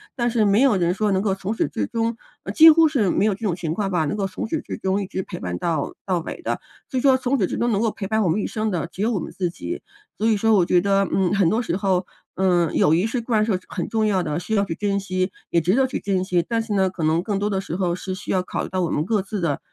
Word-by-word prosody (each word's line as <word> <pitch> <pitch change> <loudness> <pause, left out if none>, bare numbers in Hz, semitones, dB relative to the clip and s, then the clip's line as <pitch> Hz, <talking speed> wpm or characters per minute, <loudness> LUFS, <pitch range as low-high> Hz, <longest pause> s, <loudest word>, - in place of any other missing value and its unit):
但 240 -2 0
是 225 -2 +2
没 200 +3 +4
有 265 -7 +4
人 175 -1 +1
说 210 +2 0
能 190 0 +1
够 200 -3 +1
从 195 +3 -4
始 - - 0
至 - - -3
终 230 0 -1 0.3
呃， - - -4
几 320 +1 +9
乎 320 0 +6
是 250 - +1
没 200 - +2
有 215 - +2
这 190 - -9
种 175 - 0
情 165 -3 -3
况 195 +2 -2
吧， 175 -4 +1
能 145 - -2
够 200 -2 -1
从 190 - -5
始 310 +7 -2
至 - - -6
终 195 -1 0
一 195 - -4
直 190 - -4
陪 - - -8
伴 90 -1 -4
到 160 - -2
到 185 -3 0
尾 165 - -7
的。 - - -2 0.3
所 260 - 0
以 - - -2
说 265 -1 +5
从 260 +1 0
始 - - +2
至 - - -4
终 240 0 +1
能 205 -1 +1
够 230 - +2
陪 200 - -6
伴 220 +2 +1
我 190 - +2
们 170 +6 +1
一 - - -2
生 220 -1 -2
的 175 -6 -2
只 185 - -8
有 225 +3 +1
我 210 - 0
们 - - -6
自 180 -3 -1
己， 345 - -6 0.4
所 220 - +1
以 220 -2 +3
说 225 +2 +3
我 195 -4 +5
觉 180 - +3
得， 195 0 +2
嗯， 190 -1 +1
很 190 -5 +3
多 225 - +1
时 180 - -2
候， 190 -2 0 0.3
嗯， 175 -3 +2
友 155 - +4
谊 175 +5 +1
是 235 +2 -2
固 235 +1 -4
然 215 -1 +4
是 225 - -1
有 185 - 0
很 180 - -3
重 220 -1 +1
要 195 -3 +2
的， 155 -1 -2
需 180 +6 -5
要 200 - +3
去 175 - -3
珍 200 0 -1
惜， 185 0 -2 0.2
也 170 - +4
值 180 +6 +2
得 265 +1 +4
去 255 - -3
珍 190 -2 -1
惜。 180 -2 +1
但 230 -1 0
是 225 -2 -4
呢， 190 -2 +2
可 180 -3 -5
能 160 +2 +2
更 205 -1 -1
多 205 +1 0
的 195 - 0
时 170 - -5
候 180 -2 0
是 185 +1 -5
需 190 - -6
要 185 - +2
考 - - -3
虑 - - -6
到 185 0 -1
我 170 - 0
们 150 - 0
各 210 +1 +1
自 200 0 -4
的 150 -5 0
195 Hz, 345 characters per minute, -22 LUFS, 180-220 Hz, 0.4 s, 几